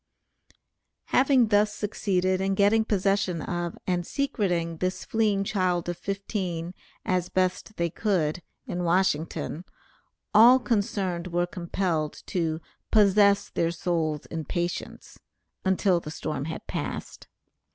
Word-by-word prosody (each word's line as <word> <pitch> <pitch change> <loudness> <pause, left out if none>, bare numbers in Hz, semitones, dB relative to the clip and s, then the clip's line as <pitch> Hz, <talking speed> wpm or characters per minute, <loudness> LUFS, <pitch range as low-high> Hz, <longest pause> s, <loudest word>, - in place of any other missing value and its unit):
Having 260 -3 +4
thus 210 0 +4
succeeded 190 -3 0
in 195 0 +1
getting 205 +3 +4
possession 195 -4 +1
of, 175 -1 -3
and 180 -1 0
secreting 175 -9 -1
this 185 +2 -2
fleeing 210 -3 +1
child 185 -4 0
of 175 - -2
fifteen, 185 -3 -4 0.3
as 180 -1 0
best 185 +3 -1
they 170 -1 -1
could, 180 -6 0 0.2
in 175 0 -3
Washington, 170 -2 0 0.7
all 235 +4 +8
concerned 200 -7 -1
were 175 0 0
compelled 170 -3 -2
to 160 -3 -1 0.3
"possess 200 -1 +4
their 165 - +1
souls 165 -3 -1
in 160 -1 -5
patience," 175 +4 -4 0.4
until 190 -1 +2
the 155 - -8
storm 155 -3 -4
had 160 - -6
passed. - - -5
185 Hz, 120 wpm, -26 LUFS, 170-200 Hz, 0.7 s, all